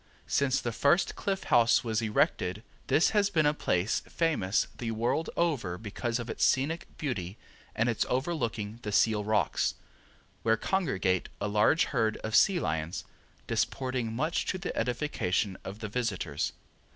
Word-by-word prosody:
Since 135 -1 +2
the 120 - -2
first 145 - +2
Cliff 195 -1 -2
House 115 0 +4
was 110 -1 0
erected 105 -2 0 0.2
this 155 - +4
has 205 -2 +3
been 160 -6 +2
a 150 - +4
place 95 -8 0
famous 145 - +1
the 120 - -3
world 120 +8 0
over 135 - 0
because 115 +4 -3
of 120 -1 -5
its - - -2
scenic 150 +6 +1
beauty 105 - -3 0.4
and 115 - +1
its 115 -3 +1
overlooking 120 -7 -2
the 105 - -4
Seal 105 0 +3
Rocks, 105 0 +1 0.7
where 115 0 +3
congregate 95 - 0
a - - -1
large 105 +10 +4
herd 110 -4 0
of 110 0 -1
sea 195 -4 +5
lions 80 - -2 0.4
disporting 130 -3 -1
much 155 +9 -1
to - - -1
the 185 - -5
edification 115 -7 -1
of 100 +3 -8
the 105 - -3
visitors. 100 - -2
115 Hz, 150 wpm, -29 LUFS, 105-150 Hz, 0.7 s, sea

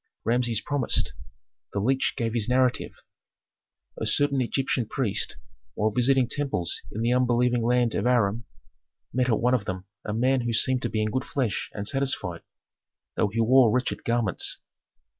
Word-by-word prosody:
Rameses 120 -1 +1
promised. 145 -4 +1 0.6
The 100 - -1
leech 130 +6 +1
gave 115 -2 -1
this 115 -1 0
narrative: 125 0 +1 1.0
"A - - -3
certain 140 -2 +2
Egyptian 125 -1 -1
priest, 115 -6 -2 0.4
while 110 +1 +1
visiting 125 +2 +3
temples 135 - -2
in 110 - -4
the 120 +1 +2
unbelieving 125 -1 +2
land 120 -1 +2
of 105 - 0
Aram, 115 -2 +1 0.7
met 125 0 +1
at 110 - +2
one 125 +2 +2
of 115 -6 +1
them 95 0 -5 0.2
a - - -4
man 125 +4 +2
who 120 -1 -2
seemed 130 +3 +2
to - - -1
him - - -8
in 110 0 0
good 130 +3 -2
flesh 125 -8 -2
and 100 0 -4
satisfied, 135 -11 -1 0.7
though 110 - +2
he 110 +3 -1
wore 125 +1 +5
wretched 125 +3 -1
garments. 115 -5 0
120 Hz, 160 wpm, -26 LUFS, 110-130 Hz, 1.0 s, wore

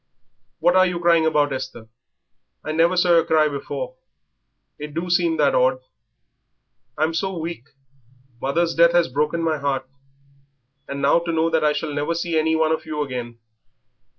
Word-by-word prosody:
"What 175 - +2
are 185 0 +5
you 180 -1 -3
crying 170 -2 +3
about, 145 -2 +1
Esther? 130 -4 -7 0.8
I 155 - -4
never 165 +3 +2
saw 175 0 +3
yer 165 - +4
cry 155 -1 +3
before. - - -5 0.8
It 150 0 -8
do 175 +2 -3
seem 170 -2 +2
that 145 -2 +3
odd." 130 0 +2 1.2
"I'm 155 +2 0
so 190 +2 -2
weak. 165 -6 -6 0.8
Mother's 165 +5 0
death 170 0 +4
has 175 -3 +3
broken 150 +5 -1
my 160 -2 0
heart, 135 -2 -2 1.0
and 140 0 -5
now 140 +4 +4
to 170 0 -4
know 165 0 +1
that 160 -1 +1
I 150 0 +3
shall 150 0 -4
never 145 +3 -2
see 170 0 -2
any 160 +1 +2
one 160 0 +1
of 160 0 -2
you 150 -1 -2
again." 120 -4 -6
160 Hz, 170 wpm, -22 LUFS, 145-170 Hz, 1.2 s, are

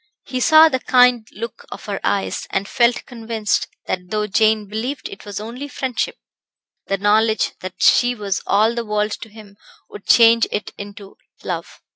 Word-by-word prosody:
He 255 0 -4
saw 315 +5 +7
the 260 -5 -1
kind 250 -3 +4
look 230 +3 -7
of - - -9
her 200 -2 -4
eyes; 200 -1 -1
and 195 +1 -2
felt 240 +2 +1
convinced 225 -3 -2 0.2
that 180 -1 -4
though 210 +1 -1
Jane 215 0 +2
believed 235 +7 -4
it 195 - -11
was 205 -1 -5
only 240 +6 -7
friendship, 280 - -3 0.7
the 195 - 0
knowledge 215 +2 +2
that 185 0 -7
she 245 0 +4
was 200 -3 -3
all 220 +3 +3
the 235 0 -3
world 210 -1 -1
to 225 - -9
him 210 -2 -15 0.3
would 205 - -11
change 230 -1 +6
it 210 - -3
into 200 -1 -10 0.3
love. - - -6
220 Hz, 170 wpm, -20 LUFS, 205-240 Hz, 0.7 s, saw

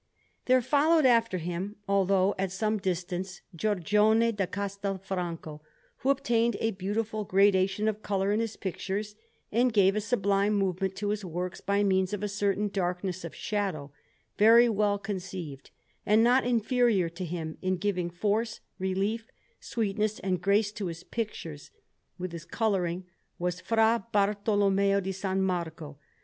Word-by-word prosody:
There 255 -1 +4
followed 300 +4 +3
after 230 -5 +4
him, 180 +4 -4
although 195 0 +3
at 190 -1 -1
some 215 +2 0
distance, 185 0 -3
Giorgione 210 +5 +3
da 200 -4 -1
Castelfranco, 190 -5 -4 0.4
who 265 - -1
obtained 235 -4 +2
a 225 - +1
beautiful 210 +3 -2
gradation 195 +1 +3
of 215 -1 -1
colour 195 -1 0
in 210 - +1
his 225 -2 -2
pictures, 200 +2 -4 0.4
and 245 +3 +3
gave 195 -2 +4
a 215 - 0
sublime 205 -2 +1
movement 190 -1 0
to 205 0 -2
his 210 0 -2
works 180 0 -4
by 200 +1 +1
means 190 0 +1
of 205 0 -3
a - - 0
certain 205 0 0
darkness 180 -1 -2
of 170 - -7
shadow, 190 -9 -3 0.5
very 230 +3 +7
well 205 -2 +1
conceived; 185 -8 -6 0.3
and 215 +2 +4
not 245 +1 +4
inferior 235 -5 +2
to 170 +3 -7
him 165 -2 -5
in 185 0 0
giving 180 -3 -1
force, 215 +5 -1 0.2
relief, 195 +4 -1 0.3
sweetness, 215 -1 -1
and 185 -2 -1
grace 205 +2 +2
to 205 -2 -4
his 165 0 -7
pictures, 170 -10 -5 0.5
with 180 -1 -4
his 170 -1 -8
colouring, 185 -5 -1 0.3
was 180 +1 -2
Fra 225 0 +2
Bartolommeo 200 -1 +2
di 195 0 -3
San 190 0 -1
Marco. 160 -5 -3
200 Hz, 145 wpm, -28 LUFS, 185-215 Hz, 0.5 s, very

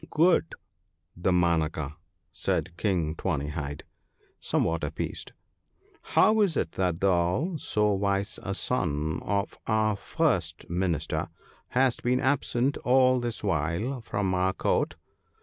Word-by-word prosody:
' - - -27
Good 170 +3 +3 0.6
Damanaka,' 85 -4 +1 0.4
said 85 - -1
King 85 -5 0
Tawny 75 -2 -2
hide, 75 -2 -5 0.6
somewhat 80 -1 0
appeased, 75 - -4 0.4
* - - -34
how 215 +2 +5
is 185 -7 +2
it 85 - 0
that 90 -3 -1
thou, 95 - +2
so 105 -6 +1
wise 100 +1 -1
a 100 - -3
son 80 - -1
of 100 0 -2
our 110 -1 +2
first 95 - -1
minister, 85 -3 -1 0.4
hast 130 -1 +2
been 125 +1 +2
absent 130 -1 +1
all 130 0 +4
this 120 -2 -4
while 95 - -1
from 100 -3 -1
our 95 +1 +1
Court - - 0
95 Hz, 125 wpm, -27 LUFS, 85-125 Hz, 0.6 s, how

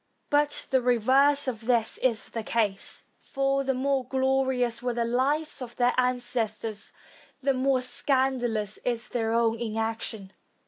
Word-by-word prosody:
But 290 0 +2
the 260 -1 +4
reverse 265 +4 +3
of 230 -3 -4
this 235 -3 +1
is 235 -4 0
the 230 - -4
case; 215 -3 -2 0.2
for 275 0 0
the 270 -1 0
more 270 0 0
glorious 260 -2 0
were 245 -1 -2
the 235 -1 0
lives 275 +6 0
of 240 -1 -7
their 245 0 +2
ancestors, 230 -4 -1 0.5
the 275 0 +3
more 260 0 +1
scandalous 250 -5 0
is 235 -2 -2
their 225 -2 -1
own 230 -1 +2
inaction. 220 -3 -3
245 Hz, 140 wpm, -27 LUFS, 225-265 Hz, 0.5 s, the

